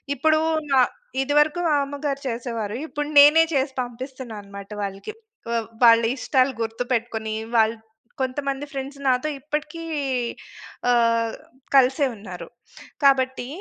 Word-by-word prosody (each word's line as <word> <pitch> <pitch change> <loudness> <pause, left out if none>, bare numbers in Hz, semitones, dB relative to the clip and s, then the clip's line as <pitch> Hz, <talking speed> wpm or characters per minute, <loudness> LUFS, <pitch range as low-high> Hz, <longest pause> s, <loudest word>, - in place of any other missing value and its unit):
ఇప్పుడు 310 +3 +3 0.3
న - - 0 0.5
ఇది 275 +2 -1
వరకు 300 +3 +3
మామ్మగారు 285 -1 -1
చేసేవారు. 230 -3 -3
ఇప్పుడు 295 -1 -4
నేనే 300 +3 +8
చేసి 270 0 0
పంపిస్తున్నాను 250 -1 -7
అన్నమాట 200 0 -11
వాళ్ళకి. 195 - -5 0.4
వ - - -1 0.3
వాళ్ళ 230 -1 +8
ఇష్టాలు 265 0 +1
గుర్తుపెట్టుకొని 225 -1 -2 0.2
వాల్ 225 0 +4 0.5
కొంతమంది 275 +2 -2
ఫ్రెండ్స్ 275 0 -6
నాతో 255 +3 +2
ఇప్పటికి 300 +4 -4 1.1
ఆహ్, 230 -1 +2 0.4
కలిసే 270 +2 +5
ఉన్నారు. 205 0 -9 0.6
కాబట్టి 260 -2 +3
260 Hz, 110 wpm, -23 LUFS, 230-285 Hz, 1.1 s, నేనే